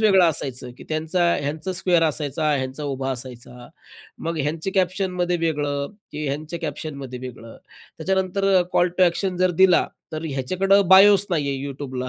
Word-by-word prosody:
वेगळं 195 -4 +5
असायचं 130 -5 -1
की - - -11
त्यांचा 160 +3 0 0.2
ह्यांचा 155 +6 -3
स्क्वेअर 175 -2 +2
असायचा, 150 +1 -2
ह्यांचा 135 +2 -4
उभा 135 -1 -3
असायचा. 125 -1 -8 0.5
मग 165 0 -4
ह्यांच्या 160 +6 -3
कॅप्शनमध्ये 180 -1 0
वेगळं 145 -2 -1 0.3
की 150 +1 -5
ह्यांच्या 155 +4 -4
कॅप्शनमध्ये 140 -4 -6
वेगळं. 120 -3 -10 0.4
त्याच्यानंतर 190 +1 0
अ, 180 - +3
कॉल 175 - +3
टू - - +5
ॲक्शन 180 +1 +1
जर 185 0 +2
दिला, 180 -2 +5 0.3
तर 155 +1 -4
ह्याच्याकडं 185 +8 +1
बायोच 195 +1 +7
नाहीये 140 -5 0
YouTubeला 130 -2 -5
155 Hz, 150 wpm, -22 LUFS, 140-185 Hz, 0.5 s, बायोच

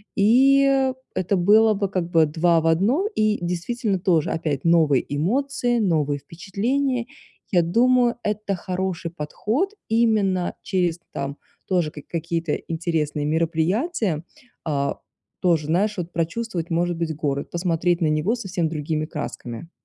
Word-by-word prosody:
и 270 +5 +4 0.2
это 185 +1 0
было 215 +4 +5
бы 200 -1 -1
как 180 -3 -2
бы 165 -1 +5
два 165 +2 +2
в 165 - 0
одном, 220 - +2
и 215 0 +2
действительно 190 +4 -1
тоже 170 -5 +2
опять 150 -4 -2
новые 160 -5 +4
эмоции, 245 - 0
новые 150 -8 +1
впечатления. 235 - -2 0.4
Я 175 -4 +4
думаю, 240 +7 +3
это 210 -1 -1
хороший 180 -2 -3
подход 215 - -2 0.2
именно 215 -5 +2
через 175 -3 0
там 140 +1 -4 0.3
тоже 175 -5 +1
ка 150 - -9
какие-то 165 -1 -2
интересные 160 -3 -2
мероприятия. 165 - 0 0.4
А, 140 -3 -1 0.4
тоже, 165 -5 +2
знаешь, 200 +6 +1
вот 175 -1 -4
прочувствовать, 170 +1 -2
может 175 0 0
быть, 160 -2 -2
город, 140 -2 -2
посмотреть 175 0 0
на 160 - +3
него 155 +10 +1
совсем 190 -7 -2
другими 155 0 -2
красками. 150 -2 -6
175 Hz, 135 wpm, -23 LUFS, 160-215 Hz, 0.4 s, было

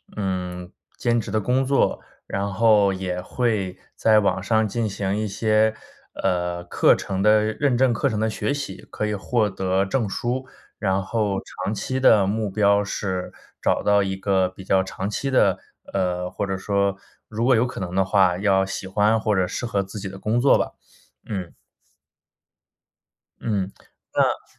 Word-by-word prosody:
嗯， 90 -3 -3 0.3
兼 120 -1 +1
职 - - -5
的 110 - +1
工 125 +5 +1
作， 135 +1 +2 0.3
然 100 +1 -2
后 105 -3 +4
也 95 -1 -3
会 105 -4 -1 0.2
在 110 -1 +4
网 95 -2 +1
上 110 +2 +2
进 115 +2 -1
行 100 +1 -2
一 110 - -1
些， 110 +2 +2 0.5
呃， 90 -2 0
课 85 - +4
程 95 -1 -3
的 105 +1 +5
认 120 +4 0
证 130 0 +4
课 120 +5 +1
程 110 -5 -1
的 110 +1 +1
学 140 - -1
习， 140 -10 -6
可 105 - -2
以 105 - -1
获 105 +1 0
得 95 0 0
证 110 +3 -1
书， 125 +5 -2 0.3
然 95 -2 +1
后 105 -2 -1 0.2
长 100 - -1
期 130 +5 -2
的 110 -6 +5
目 105 +1 -1
标 100 +1 +3
是 95 -3 -3 0.3
找 - - +1
到 105 0 +4
一 95 -1 -1
个 95 -1 +1
比 95 +1 -12
较 95 0 +3
长 95 +1 -4
期 135 +6 -2
的， 130 - +3 0.3
呃， 90 -2 -1
或 100 - -2
者 95 0 -2
说 100 0 0 0.3
如 110 +1 -2
果 130 0 +5
有 115 +2 +3
可 125 - -6
能 90 -2 -4
的 95 - +4
话， 95 -2 +3
要 95 -1 +2
喜 95 - -5
欢 105 +3 +2
或 105 -1 +1
者 95 -2 +2
适 120 - -4
合 100 -4 0
自 100 +2 -8
己 100 -1 -5
的 95 0 -10
工 110 +4 0
作 135 +3 +5
吧。 - - -2 0.6
嗯。 95 -5 -4 1.9
嗯， 100 -4 -1 0.4
那 - - +2
100 Hz, 190 characters per minute, -23 LUFS, 95-110 Hz, 1.9 s, 的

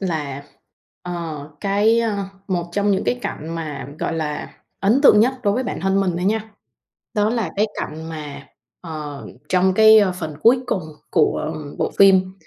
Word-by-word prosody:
là, 150 -7 -3 0.6
ờ, 165 -4 -6
cái, 210 +3 +3
ơ, 225 -3 -1 0.3
một 175 -2 -1
trong 205 +2 +1
những 190 - +1
cái 245 - 0
cảnh 155 - -5
mà, 150 -5 -5
gọi 165 - -2
là, 150 -2 -4 0.3
ấn 220 +7 +3
tượng 210 -7 +7
nhất 255 +4 +3
đối 200 - +2
với 255 - 0
bản - - -4
thân 190 +1 +1
mình 195 -2 +1
thôi 180 - -2
nha, 220 +2 0 0.6
đó 210 0 +2
là 225 -7 -1
cái 210 - +3
cảnh 160 +1 -6
mà, 145 -3 -8 0.3
ờ, 150 -4 -7 0.2
trong 185 0 +3
cái 220 +1 +8 0.2
phần 155 -2 -5
cuối 245 +3 +5
cùng 185 - -1 0.3
của 160 - +1 0.2
bộ - - 0
phim, 190 -1 +5
185 Hz, 175 wpm, -21 LUFS, 160-210 Hz, 0.6 s, cái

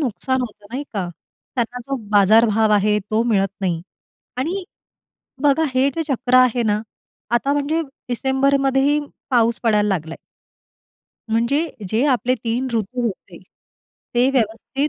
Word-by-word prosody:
नुकसान 260 0 -1
होतं 210 -4 -7
नाही 260 +4 -3
का? 190 -4 -2 0.5
त्यांना 245 0 -1
जो 275 - -2
बाजारभाव 215 +2 +5
आहे 210 0 +3
तो 220 +1 +2
मिळत 200 -5 +2
नाही. 175 -4 -1 0.6
आणि 350 +9 -2 0.8
बघा 290 +2 +3
हे 260 +2 +3
जे 330 - -1
चक्र 250 0 -1
आहे 250 -1 +4
ना, 210 -1 +1 0.5
आता 240 +4 +1
म्हणजे 290 +3 0 0.3
डिसेंबर 265 +3 +2
मध्येही 270 +2 +2 0.3
पाऊस 235 -2 +3
पडायला 210 -2 +2
लागलाय. 165 -4 -3 1.1
म्हणजे 235 +8 +1 0.2
जे 225 +7 +1
आपले 250 -1 +2
3 240 +2 -2
ऋतू 230 +2 -2
होते, 195 - -7 0.8
ते 250 +3 +4
व्यवस्थित 255 +4 -1
240 Hz, 135 wpm, -20 LUFS, 215-270 Hz, 1.1 s, बाजारभाव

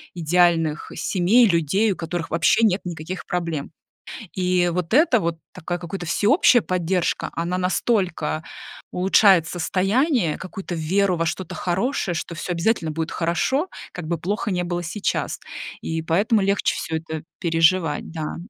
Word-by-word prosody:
идеальных 165 -2 +2
семей, 200 +6 +3
людей, 185 +5 +2
у - - -2
которых 165 0 -4
вообще 170 +7 +3
нет 200 -2 +2
никаких 175 +1 -6
проблем. 165 -5 -3 0.6
И 180 -1 +1
вот 180 +3 -2
эта 270 -5 +5
вот 170 -2 -1 0.2
такая 175 +2 -4
какая-то 175 +1 -6
всеобщая 230 - +4
поддержка, 180 -1 -1
она 170 +2 -2
настолько 180 -4 0 0.5
улучшает 190 -1 +5
состояние, 195 - +1
какую-то 185 -1 -6
веру 180 +3 +1
во 165 - 0
что-то 175 +1 -4
хорошее, 190 +1 -1
что 170 +1 -4
всё 170 +3 -4
обязательно 170 -2 0
будет 160 +1 -3
хорошо, 225 - 0 0.2
как 175 -3 -7
бы 170 +1 -1
плохо 200 +7 -2
ни 180 -2 0
было 175 0 -3
сейчас. 185 +5 -2 0.4
И 160 0 -2
поэтому 200 +7 +2
легче 200 0 +1
всё 160 - -3
это 160 -1 -5 0.2
переживать, 165 -1 +2
да. 160 -2 -4
175 Hz, 145 wpm, -22 LUFS, 165-195 Hz, 0.6 s, эта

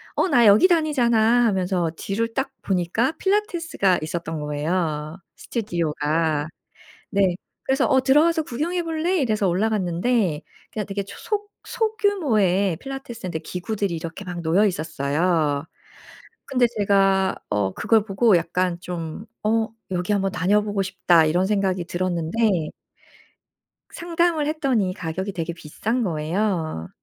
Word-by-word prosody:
어 375 - +1
"나 240 -5 +5
여기 210 - +7
다니잖아." 245 -8 +3
하면서 185 -5 0
뒤를 225 +3 -2
딱 270 +1 -2
보니까 190 - 0
필라테스가 345 - +1
있었던 160 0 -4
거예요, 150 +1 -2 0.2
스튜디오가. 160 - -1 0.6
네. 195 -3 +2 0.3
그래서 270 +1 +2
"어 265 - +4
들어와서 310 +4 +3
구경해 335 +8 -2
볼래?" 330 +3 0
이래서 215 -6 +1
올라갔는데 185 -2 0 0.3
그냥 210 -2 -3
되게 200 0 -3
초속 415 - -5
소규모의 285 - +1
필라테스인데 235 - -6
기구들이 185 +1 -3
이렇게 165 +4 -7
막 175 -1 -5
놓여 175 +6 +3
있었어요. 155 -2 0 0.8
근데 250 -2 +2
제가 195 -1 +3
어 100 -2 0
그걸 220 -2 +2
보고 200 -1 +3
약간 175 +1 -1
좀 175 +2 -6 0.2
'어 220 +1 +2 0.2
여기 180 +3 0
한번 195 -1 0
다녀보고 205 +2 +1
싶다.' 185 -4 +3
이런 175 +4 +2
생각이 190 -3 0
들었는데 175 0 0 1.2
상담을 335 -3 0
했더니 260 -12 0
가격이 185 +3 -4
되게 170 0 -3
비싼 220 +10 -3
거예요. 160 - -2
195 Hz, 295 characters per minute, -23 LUFS, 170-240 Hz, 1.2 s, 여기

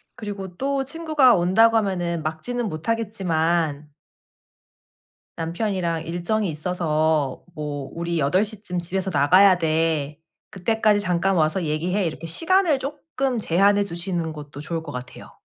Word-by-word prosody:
그리고 195 -4 -7
또 275 +2 0
친구가 300 -4 +3
온다고 215 +6 +4
하면은 175 -5 -1
막지는 215 +10 -3
못하겠지만 165 -6 -1 1.4
남편이랑 170 -1 -2
일정이 175 +5 -1
있어서 155 -3 0
뭐 145 -2 -5
"우리 170 0 -2
8:00 195 +9 0
쯤 180 -3 -3
집에서 190 +2 -2
나가야 185 +6 +5
돼. 155 -3 0 0.3
그때까지 215 +2 +2
잠깐 190 0 +1
와서 160 +2 +1
얘기해." 170 +6 -1
이렇게 165 0 -4
시간을 330 - +2
조금 275 -2 -3
제한해 200 +2 +3
두시는 175 -3 -3
것도 145 -2 -9
좋을 165 +1 -4
것 155 - -7
같아요. 125 -1 -9
175 Hz, 290 characters per minute, -23 LUFS, 160-210 Hz, 1.4 s, 나가야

